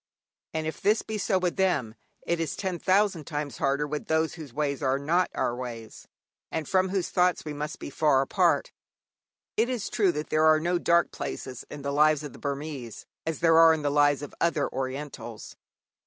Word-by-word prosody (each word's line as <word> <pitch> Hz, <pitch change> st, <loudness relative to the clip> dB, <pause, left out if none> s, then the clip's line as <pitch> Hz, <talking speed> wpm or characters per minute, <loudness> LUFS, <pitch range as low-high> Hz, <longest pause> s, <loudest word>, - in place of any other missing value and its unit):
And 160 Hz, 0 st, -1 dB
if 160 Hz, -, -5 dB
this 210 Hz, +2 st, +3 dB
be 220 Hz, -1 st, -4 dB
so 195 Hz, -1 st, +1 dB
with 180 Hz, 0 st, -1 dB
them, 140 Hz, -, +1 dB, 0.3 s
it 170 Hz, -1 st, 0 dB
is 165 Hz, -3 st, -2 dB
ten 185 Hz, -3 st, -3 dB
thousand 190 Hz, -4 st, +2 dB
times 145 Hz, -4 st, -4 dB
harder 140 Hz, +2 st, +1 dB
with 150 Hz, 0 st, -5 dB
those 160 Hz, 0 st, +1 dB
whose 155 Hz, -6 st, -9 dB
ways 140 Hz, +1 st, -2 dB
are 135 Hz, -1 st, +2 dB
not 165 Hz, +6 st, +1 dB
our 120 Hz, -, 0 dB
ways, 115 Hz, -3 st, -8 dB, 0.4 s
and 160 Hz, -2 st, -3 dB
from 185 Hz, 0 st, +2 dB
whose 190 Hz, -1 st, -1 dB
thoughts 180 Hz, -2 st, +2 dB
we 150 Hz, -, -4 dB
must 150 Hz, +1 st, -5 dB
be -, -, -8 dB
far 135 Hz, -2 st, +3 dB
apart. -, -, +2 dB, 0.9 s
It 225 Hz, +3 st, +2 dB
is 245 Hz, -5 st, -3 dB
true 200 Hz, -6 st, +3 dB
that 150 Hz, +1 st, -5 dB
there 155 Hz, 0 st, +3 dB
are 155 Hz, 0 st, +6 dB
no 175 Hz, +2 st, 0 dB
dark 170 Hz, 0 st, +3 dB
places 125 Hz, -2 st, -6 dB
in 145 Hz, -1 st, -8 dB
the 140 Hz, 0 st, -2 dB
lives 150 Hz, 0 st, +4 dB
of 145 Hz, -, -7 dB
the -, -, -13 dB
Burmese 140 Hz, -4 st, -5 dB, 0.2 s
as 160 Hz, -2 st, -2 dB
there 165 Hz, -1 st, +6 dB
are 165 Hz, -1 st, +8 dB
in 155 Hz, -, -5 dB
the 145 Hz, -, +1 dB
lives 145 Hz, -1 st, +3 dB
of 145 Hz, -, -8 dB
other 165 Hz, -3 st, +2 dB
Orientals. 130 Hz, -4 st, -5 dB
155 Hz, 200 wpm, -27 LUFS, 140-170 Hz, 0.9 s, are